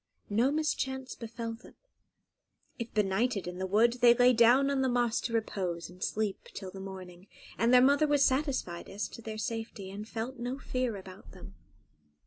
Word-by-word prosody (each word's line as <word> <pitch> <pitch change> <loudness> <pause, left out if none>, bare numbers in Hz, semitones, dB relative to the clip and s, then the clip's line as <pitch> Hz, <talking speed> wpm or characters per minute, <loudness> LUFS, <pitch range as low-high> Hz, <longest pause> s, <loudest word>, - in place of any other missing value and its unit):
No 230 +6 +3
mischance 265 -4 -2
befell 230 0 -6
them; 225 +2 -14 1.0
if 235 0 -5
benighted 205 +1 0
in 180 +1 -6
the 190 - -2
wood, 235 +5 +3
they 240 -1 +7
lay 245 +1 +5
down 245 +4 +5
on 275 -1 +1
the 260 - +2
moss 240 -1 +1
to 235 - -4
repose 185 -6 -2
and 180 0 -8
sleep 215 -2 -2
till 190 -2 -6
the 195 - -9
morning; 190 -1 -9 0.3
and 230 +1 +2
their 250 0 +7
mother 285 +3 +4
was 290 -1 +4
satisfied 260 - -1
as 200 +2 -3
to - - -10
their 220 -1 -6
safety, 225 -4 -5
and 210 +3 -8
felt 235 +3 -5
no 245 +2 -3
fear 255 -4 -2
about 190 0 -12
them. - - -12
230 Hz, 180 wpm, -30 LUFS, 195-255 Hz, 1.0 s, they